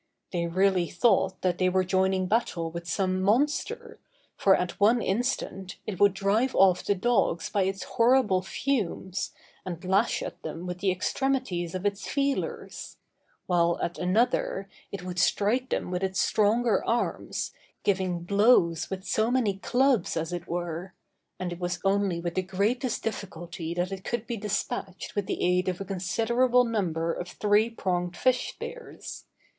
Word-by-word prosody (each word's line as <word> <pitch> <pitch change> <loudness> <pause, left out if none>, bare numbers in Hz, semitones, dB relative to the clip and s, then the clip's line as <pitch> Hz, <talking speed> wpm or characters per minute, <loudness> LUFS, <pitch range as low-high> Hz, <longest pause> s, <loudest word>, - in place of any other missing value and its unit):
They 170 -2 -1
really 185 0 +2
thought 190 0 +2
that 180 -1 +1
they 185 0 +3
were 185 +1 +2
joining 190 0 +1
battle 180 -5 0
with 170 +1 -6
some 185 +2 0
monster, 295 - 0 0.4
for 190 -1 +5
at 180 -1 -3
one 220 +4 +5
instant, 200 -4 -2
it 190 -5 -5
would 200 -1 +5
drive 210 +6 +1
off 185 -2 +5
the 205 - +1
dogs 195 -5 +1
by 200 -2 +2
its 190 0 -2
horrible 230 -5 +3
fumes, 190 -3 -2 0.3
and 180 -1 -6
lash 195 +5 +2
at 175 - -7
them 165 +2 -6
with 180 0 -5
the 195 +1 +1
extremities 185 -3 -1
of 185 +2 -4
its 205 0 -1
feelers; 280 -1 -2 0.5
while 170 -1 +2
at 170 - -3
another, 195 +1 +1 0.2
it 195 -3 -6
would 180 0 -4
strike 230 +7 +2
them - - -2
with 180 +1 -2
its 190 -1 -1
stronger 220 +2 +2
arms, 235 +1 -1 0.3
giving 185 -3 0
blows 200 -4 +3
with 190 -1 -5
so 220 +1 +1
many 235 -6 +1
clubs, 250 -1 +2
as 165 +2 -2
it 175 -1 -5
were; 175 +1 -4 0.4
and 180 -1 -3
it 175 - -10
was 180 0 -2
only 195 -3 +1
with 170 0 -3
the 185 - +1
greatest 215 +7 -1
difficulty 170 -5 -5
that 175 +2 -1
it 190 -1 -6
could 235 -2 -3
be 235 - -3
despatched 200 -2 -3
with 205 -2 -2
the - - -2
aid 180 +1 +2
of 180 - -3
a 195 - -4
considerable 230 +7 +2
number 170 -8 -1
of 180 - -5
three 210 +4 +2
pronged 180 -5 -2
fish 255 -1 +2
spears. 485 -1 -8
190 Hz, 160 wpm, -27 LUFS, 180-225 Hz, 0.5 s, for